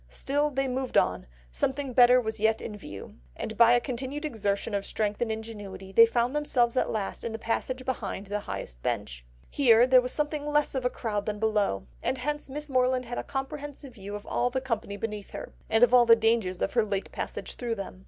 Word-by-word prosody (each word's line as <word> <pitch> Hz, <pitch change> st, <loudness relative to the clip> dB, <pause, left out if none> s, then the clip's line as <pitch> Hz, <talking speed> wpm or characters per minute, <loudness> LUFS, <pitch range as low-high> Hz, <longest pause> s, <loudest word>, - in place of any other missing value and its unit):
Still 290 Hz, -, 0 dB
they 270 Hz, -1 st, -1 dB
moved 260 Hz, 0 st, -1 dB
on, -, -, +2 dB, 0.2 s
something 265 Hz, -, -1 dB
better 250 Hz, 0 st, +7 dB
was 220 Hz, -2 st, -3 dB
yet 220 Hz, +1 st, +2 dB
in 215 Hz, -, -6 dB
view; 100 Hz, -, -10 dB, 0.2 s
and 220 Hz, -, -5 dB
by 235 Hz, +2 st, +7 dB
a 245 Hz, -, +5 dB
continued 260 Hz, +5 st, -4 dB
exertion 210 Hz, -5 st, -2 dB
of 200 Hz, -1 st, 0 dB
strength 210 Hz, +1 st, -2 dB
and 235 Hz, -2 st, 0 dB
ingenuity 205 Hz, -4 st, -7 dB
they 230 Hz, +4 st, +8 dB
found 240 Hz, +3 st, 0 dB
themselves 250 Hz, -5 st, +1 dB
at -, -, +1 dB
last 205 Hz, -3 st, -3 dB
in 230 Hz, -, -3 dB
the -, -, -3 dB
passage 255 Hz, +3 st, -2 dB
behind 235 Hz, -6 st, -3 dB
the 205 Hz, +1 st, -2 dB
highest -, -, -7 dB
bench. -, -, -3 dB, 0.3 s
Here 240 Hz, -4 st, +6 dB
there 255 Hz, 0 st, +6 dB
was 250 Hz, 0 st, -4 dB
something 300 Hz, 0 st, -2 dB
less 295 Hz, 0 st, +1 dB
of 250 Hz, -2 st, 0 dB
crowd 210 Hz, -3 st, -3 dB
than 210 Hz, -1 st, -2 dB
below; 210 Hz, -, 0 dB, 0.2 s
and 265 Hz, -, -1 dB
hence 295 Hz, +3 st, -3 dB
Miss 295 Hz, +3 st, -3 dB
Morland 255 Hz, -1 st, +1 dB
had 240 Hz, +1 st, -4 dB
a -, -, -3 dB
comprehensive 280 Hz, 0 st, -6 dB
view 205 Hz, -2 st, -7 dB
of 205 Hz, -, -8 dB
all 245 Hz, -, 0 dB
the 260 Hz, +1 st, -1 dB
company 230 Hz, -6 st, -3 dB
beneath 210 Hz, -1 st, -5 dB
her, -, -, -8 dB, 0.2 s
and 225 Hz, +2 st, +4 dB
of 245 Hz, 0 st, +5 dB
all 245 Hz, -1 st, +7 dB
the 230 Hz, -, +9 dB
dangers 225 Hz, -5 st, +1 dB
of -, -, -1 dB
her 235 Hz, -, +3 dB
late 200 Hz, -2 st, -3 dB
passage -, -, -5 dB
through 235 Hz, -2 st, -3 dB
them. 195 Hz, -2 st, -7 dB
235 Hz, 215 wpm, -28 LUFS, 210-260 Hz, 0.3 s, the